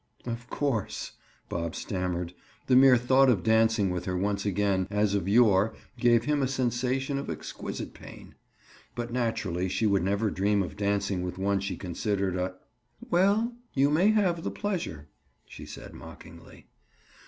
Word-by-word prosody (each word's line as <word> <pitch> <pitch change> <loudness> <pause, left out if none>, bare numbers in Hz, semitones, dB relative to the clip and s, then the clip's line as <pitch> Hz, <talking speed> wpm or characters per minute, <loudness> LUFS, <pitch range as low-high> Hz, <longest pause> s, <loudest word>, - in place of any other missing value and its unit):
"Of 120 0 -5
course," 135 -8 -2 0.4
Bob 85 -1 -3
stammered. 90 -2 -3 0.3
The 130 - +3
mere 130 -1 +7
thought 130 +2 +4
of 100 -8 +2
dancing 110 -2 +3
with 90 -1 -3
her 90 -1 -1
once 100 +2 -1
again 100 -1 +1
as 105 0 +1
of 100 -2 -1
yore 105 -2 +4 0.2
gave 120 -2 +4
him 150 0 +1
a 135 - +2
sensation 130 +2 -1
of 140 - -6
exquisite 80 - -6
pain. - - -13 0.6
But 120 -1 -4
naturally 95 -7 -1
she 95 +5 0
would 100 -2 +3
never 100 +2 0
dream 100 +1 +1
of 90 - -7
dancing 100 -2 0
with 90 0 -4
one 100 +1 +1
she 100 - -4
considered 95 +1 -2
a—? 90 0 -2 0.6
"Well, 200 +7 +3 0.2
you 140 +1 +3
may 175 +7 +4
have 185 -6 +2
the - - -1
pleasure," 170 - -4 0.4
she - - -11
said - - -10
mockingly. - - -13
105 Hz, 155 wpm, -28 LUFS, 95-130 Hz, 0.6 s, mere